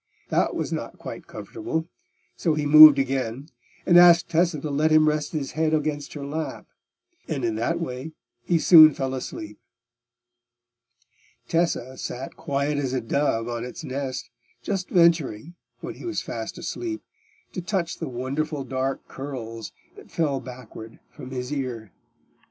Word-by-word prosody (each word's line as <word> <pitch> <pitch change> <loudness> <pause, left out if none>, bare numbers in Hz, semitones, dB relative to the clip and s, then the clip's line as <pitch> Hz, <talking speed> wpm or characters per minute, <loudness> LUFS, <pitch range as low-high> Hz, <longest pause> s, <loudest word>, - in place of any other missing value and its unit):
That - - +1
was - - -3
not - - -5
quite - - -9
comfortable; 245 - -5 0.5
so 160 -3 0
he 150 -1 -1
moved 155 0 +10
again, 135 0 -2 0.4
and 175 0 +7
asked 175 -1 +7
Tessa 170 -1 +1
to 150 - -4
let 150 +3 +2
him 155 0 +5
rest 150 0 0
his 145 -4 -3
head 160 0 +1
against 150 -1 -2
her 145 -2 -6
lap; 155 +3 -5 0.6
and 140 -6 -2
in 115 - 0
that 165 +10 -1
way 135 -1 -5 0.3
he 175 - +2
soon 155 -2 +8
fell 135 -1 -2
asleep. 105 -5 -7 1.9
Tessa 165 -6 -1
sat 130 +2 -6
quiet 140 +1 -1
as 130 -3 -2
a 130 - +1
dove 115 -1 0
on 120 -1 -4
its 125 +5 -8
nest, 130 -4 -5 0.3
just 195 -2 -3
venturing, 165 -5 +2 0.3
when - - -6
he - - -13
was 345 - -2
fast - - -6
asleep, 335 -2 -5 0.5
to 180 - -4
touch 175 -2 -2
the 165 - -4
wonderful 140 +4 -3
dark 130 0 -3
curls 115 -5 -7 0.3
that - - -14
fell 145 -5 0
backward 125 -3 -11
from 125 - -10
his 125 +1 -4
ear. 120 -7 -4
145 Hz, 150 wpm, -24 LUFS, 130-160 Hz, 1.9 s, moved